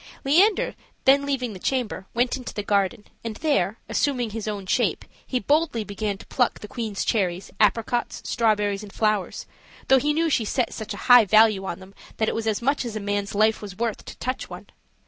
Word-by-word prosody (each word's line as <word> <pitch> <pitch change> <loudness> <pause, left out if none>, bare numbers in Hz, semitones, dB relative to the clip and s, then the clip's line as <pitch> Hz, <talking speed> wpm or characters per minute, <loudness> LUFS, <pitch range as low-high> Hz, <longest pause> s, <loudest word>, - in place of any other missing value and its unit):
Leander, 370 +10 +3 0.3
then 280 +1 +5
leaving 255 -5 -1
the 190 - -9
chamber, 240 -4 -2
went 245 +1 +2
into 255 -2 -7
the 210 - -3
garden, 205 +2 0 0.2
and 225 -2 -4
there, 220 - 0
assuming 250 -6 0
his 220 0 -5
own 205 -2 -4
shape, - - 0 0.2
he 255 - 0
boldly 285 -1 +1
began 205 0 -3
to - - -13
pluck 245 -2 0
the 210 - -8
queen's 225 -5 -4
cherries, 185 -4 -1
apricots, 230 +3 +1
strawberries, 210 -3 +1
and 210 -2 -10
flowers, 215 -3 -1 0.4
though 265 - +7
he 295 +3 +1
knew 325 +2 +1
she 275 -7 +1
set 245 +3 -1
such 220 -1 -5
a - - -9
high 245 -2 +8
value 215 -1 +4
on - - -4
them 190 +1 -14 0.2
that 220 - +1
it - - 0
was 225 0 -3
as 220 +1 -1
much 280 +3 +1
as 235 -3 -5
a - - -2
man's 205 0 -2
life 215 +1 +3
was 200 -3 -8
worth 230 -2 -2
to - - -10
touch 255 +1 -4
one. - - -9
220 Hz, 205 wpm, -24 LUFS, 205-255 Hz, 0.4 s, high